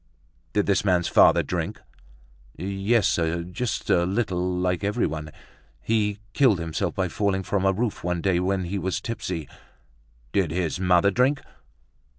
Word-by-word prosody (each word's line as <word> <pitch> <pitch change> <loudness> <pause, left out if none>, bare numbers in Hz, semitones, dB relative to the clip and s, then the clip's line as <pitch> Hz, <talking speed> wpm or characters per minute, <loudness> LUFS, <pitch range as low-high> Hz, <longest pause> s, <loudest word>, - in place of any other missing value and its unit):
"Did 105 - +2
this 100 -1 +2
man's 90 -3 +2
father - - +5
drink?" - - -3 0.8
"Yes, 100 +4 +1
sir; 85 0 0
just 95 +7 -4
a 85 - +4
little 90 -2 -1
like 90 +1 0
everyone. 80 -8 -1 0.5
He 105 - 0 0.2
killed 130 -8 +4
himself 85 -1 -3
by 95 -1 0
falling 95 +2 -1
from 95 0 -1
a - - +5
roof 110 +3 -2
one 90 0 -1
day 90 0 +1
when 95 +1 0
he 95 +3 -3
was 95 0 -2
tipsy." 90 -8 -4 0.8
"Did 95 -5 +1
his 85 -1 -2
mother 90 +1 +4
drink?" 130 +6 +2
95 Hz, 150 wpm, -25 LUFS, 90-100 Hz, 0.8 s, father